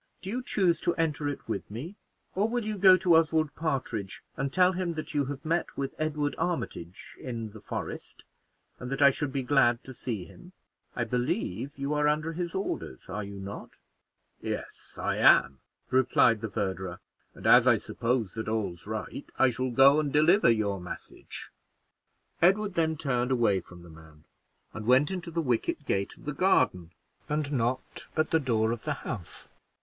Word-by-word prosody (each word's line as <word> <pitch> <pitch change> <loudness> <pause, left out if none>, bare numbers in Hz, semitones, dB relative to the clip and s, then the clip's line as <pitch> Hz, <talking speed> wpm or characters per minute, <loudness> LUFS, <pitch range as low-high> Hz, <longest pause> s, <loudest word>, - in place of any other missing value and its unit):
Do 190 - -4
you 250 +3 -2
choose 185 -8 +1
to 175 - +1
enter 155 -3 0
it 145 - -6
with 110 -3 -4
me, 135 - -7 0.4
or 205 +4 +1
will 240 -1 -1
you 215 -2 -3
go 185 -1 +8
to 180 -2 +4
Oswald 160 -2 +2
Partridge 130 -10 -3
and 135 0 -2
tell 180 +2 +4
him 180 -2 -2
that 155 - -5
you 145 -2 +1
have 140 +3 -6
met 165 +2 -1
with 135 -1 -3
Edward 150 -2 -1
Armitage 95 - -4
in 115 -4 -5
the 110 0 -12
forest, - - -6 0.6
and 125 +1 -6
that 135 +1 +1
I 140 - +8
should 145 0 -3
be 135 -1 -2
glad 125 -3 +3
to 130 - -9
see 110 -7 -4
him? 180 - -15 0.4
I 120 - 0
believe 125 - -2
you 140 +2 -2
are 150 0 +2
under 155 +2 0
his 175 0 -4
orders, 190 - -4
are 105 +3 -3
you 100 0 -8
not?" 100 +1 -8 0.6
"Yes - - -6
I - - -1
am," 65 - +5 0.3
replied 125 -3 +4
the 115 - -3
verderer, 95 -3 -3 0.4
"and - - -12
as - - +7
I - - +6
suppose 115 -4 -2
that 110 -1 -5
all's 100 -5 -3
right, 110 +5 -5
I 130 -1 +4
shall 130 +2 -2
go 135 +4 +6
and 150 -2 -1
deliver 155 - +5
your 105 -4 +1
message." 90 - -9 0.9
Edward 200 +3 +3
then 160 -2 +1
turned 125 -3 0
away 115 -7 +3
from 90 -1 -14
the 85 - -13
man, 80 -1 -16 0.5
and 110 0 -7
went 130 +6 +5
into 180 -2 -4
the 165 0 -2
wicket 120 -5 -1
gate 100 0 -1
of - - -17
the 150 - -2
garden, 90 - +2 0.4
and 150 -1 -1
knocked 125 0 -2
at 155 0 +1
the 160 - +4
door 115 -5 +1
of 115 -1 -3
the 155 - 0
House. 90 -9 -6
135 Hz, 185 wpm, -28 LUFS, 110-160 Hz, 0.9 s, go